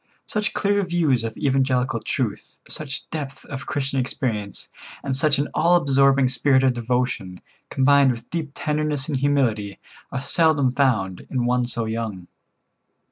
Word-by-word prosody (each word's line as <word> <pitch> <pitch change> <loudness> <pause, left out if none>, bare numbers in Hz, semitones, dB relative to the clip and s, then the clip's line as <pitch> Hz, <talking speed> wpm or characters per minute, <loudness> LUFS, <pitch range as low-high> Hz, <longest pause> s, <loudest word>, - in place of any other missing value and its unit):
Such 210 -1 -2
clear 200 0 +1
views 165 -9 +1
of 115 -1 -5
evangelical 130 -2 +1
truth, - - -4
such 135 -3 -3
depth 145 -4 -6
of 135 -1 -7
Christian 135 -1 -1
experience, 110 -5 -3 0.4
and 135 -2 -1
such 145 +2 +2
an 145 +1 0
all 170 +2 +4
absorbing 135 -4 +4
spirit 130 +1 +2
of 130 -1 +4
devotion, 120 -6 -2 0.3
combined 140 0 +4
with 120 -2 -4
deep 160 -4 -3
tenderness 150 -2 -1
and 145 -4 -1
humility, 120 -8 0 0.3
are 135 - -2
seldom 145 -1 +2
found 115 -9 0
in 125 -2 -1
one 125 0 +2
so 120 -1 -2
young. 110 -5 -4
135 Hz, 145 wpm, -23 LUFS, 120-145 Hz, 0.4 s, all